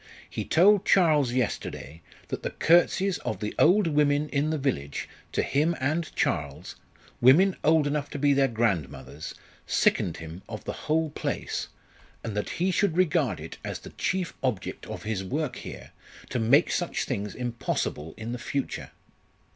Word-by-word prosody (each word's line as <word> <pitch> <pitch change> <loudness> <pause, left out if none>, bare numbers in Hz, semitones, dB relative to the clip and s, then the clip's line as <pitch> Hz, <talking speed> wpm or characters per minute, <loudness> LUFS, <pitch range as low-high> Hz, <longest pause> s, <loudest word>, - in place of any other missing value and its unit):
"He - - -4
told 195 +4 +5
Charles 155 -9 +4
yesterday 85 - -3 0.3
that - - -3
the - - -2
curtseys 175 +3 +3
of 110 - -4
the 105 0 -3
old 195 +5 +5
women 150 -1 +2
in 145 +2 0
the 160 - 0
village 95 - -2 0.2
to - - 0
him 155 +5 +1
and 155 +5 0
Charles 75 -1 -2 0.5
women 175 +10 +6
old 155 -1 +4
enough 145 0 -1
to - - -5
be 145 0 +3
their 135 0 +4
grandmothers 85 - -2 0.3
sickened 85 - +2
him 80 +2 -8
of - - -6
the - - -4 0.2
whole 160 0 +2
place, - - -3 0.6
and 110 -3 -4
that 105 - -2
he 185 +2 +2
should 180 -1 +1
regard 155 - +2
it - - -9
as - - -4
the - - -11
chief 185 -2 -2
object 120 -9 -3
of - - -6
his 105 -3 -2
work 140 +6 -2
here - - -9 0.4
to 125 - 0
make 130 +8 +4
such 175 - -1
things 105 -5 -3
impossible 115 -10 -3
in 110 +1 -5
the 125 - -4
future. 140 +2 -3
140 Hz, 165 wpm, -27 LUFS, 105-160 Hz, 0.6 s, women